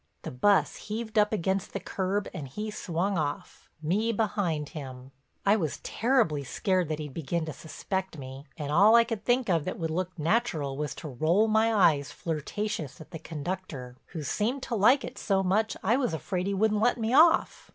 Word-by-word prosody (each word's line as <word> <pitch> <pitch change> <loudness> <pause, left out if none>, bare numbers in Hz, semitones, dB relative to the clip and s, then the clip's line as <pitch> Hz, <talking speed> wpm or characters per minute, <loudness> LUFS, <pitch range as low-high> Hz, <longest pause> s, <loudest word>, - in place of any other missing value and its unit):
The - - -5
bus 195 +11 +2
heaved 220 0 -2
up 210 0 +3
against 190 -2 -1
the - - -2
curb 195 +2 -2
and 155 -7 -6
he 210 +10 -5
swung 185 0 -1
off, 145 -2 -5
me 210 +9 +1
behind 195 -9 -1
him. 130 -4 -8 0.3
I 200 +1 +5
was 160 - -2
terribly 225 - +1
scared 185 +5 0
that 155 - -1
he'd 150 -3 -6
begin 165 +2 -2
to 155 - -5
suspect 190 +3 -4
me, 135 +1 -9
and 145 -2 -4
all 205 +8 +6
I 235 - +7
could 225 -3 -5
think 245 0 +2
of 170 -5 +2
that 185 - -3
would 160 -1 -2
look 180 +2 -3
natural 160 - 0
was 150 -1 -3
to 160 - -7
roll 160 - +2
my 220 +1 +3
eyes 160 -9 +3
flirtatious 165 +1 -4
at 155 - -12
the 165 - -6
conductor, 155 -5 -6
who 160 -4 -6
seemed 235 - -1
to 235 - -2
like 245 +7 +5
it - - -7
so 195 -2 +1
much 210 +4 +1
I 225 +6 +3
was 250 -12 0
afraid 180 +3 -3
he 200 - 0
wouldn't 210 +1 +2
let 245 +2 +3
me 225 +1 -1
off. 325 +4 +4
185 Hz, 195 wpm, -28 LUFS, 155-215 Hz, 0.3 s, I